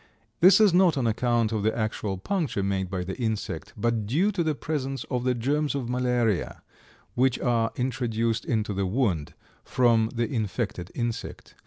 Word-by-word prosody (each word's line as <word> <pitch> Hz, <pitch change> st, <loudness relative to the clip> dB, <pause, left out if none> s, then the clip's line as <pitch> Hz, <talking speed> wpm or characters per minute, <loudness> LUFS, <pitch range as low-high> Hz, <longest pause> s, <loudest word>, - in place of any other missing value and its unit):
This 185 Hz, +5 st, +7 dB
is 210 Hz, -5 st, +5 dB
not 175 Hz, -4 st, +4 dB
on 130 Hz, -, 0 dB
account 115 Hz, 0 st, +1 dB
of 110 Hz, -2 st, -1 dB
the 110 Hz, +3 st, 0 dB
actual 110 Hz, -3 st, -2 dB
puncture 145 Hz, -, -2 dB
made 95 Hz, -1 st, -1 dB
by 90 Hz, -1 st, -2 dB
the 95 Hz, +1 st, -5 dB
insect, 110 Hz, -4 st, -3 dB
but 115 Hz, -3 st, 0 dB
due 170 Hz, -, +2 dB
to 185 Hz, -4 st, -1 dB
the 155 Hz, -2 st, 0 dB
presence 135 Hz, -3 st, -3 dB
of 125 Hz, -2 st, -1 dB
the 125 Hz, -1 st, +2 dB
germs 145 Hz, +5 st, 0 dB
of 130 Hz, -4 st, -3 dB
malaria, 125 Hz, -5 st, 0 dB, 0.5 s
which 130 Hz, 0 st, +2 dB
are 115 Hz, -2 st, +1 dB
introduced 115 Hz, -3 st, -1 dB
into 105 Hz, -2 st, -1 dB
the 95 Hz, -1 st, -1 dB
wound 95 Hz, -, -1 dB, 0.3 s
from 115 Hz, -3 st, +2 dB
the 120 Hz, 0 st, 0 dB
infected 105 Hz, -6 st, -3 dB
insect. 120 Hz, -2 st, -4 dB
120 Hz, 170 wpm, -26 LUFS, 110-130 Hz, 0.5 s, This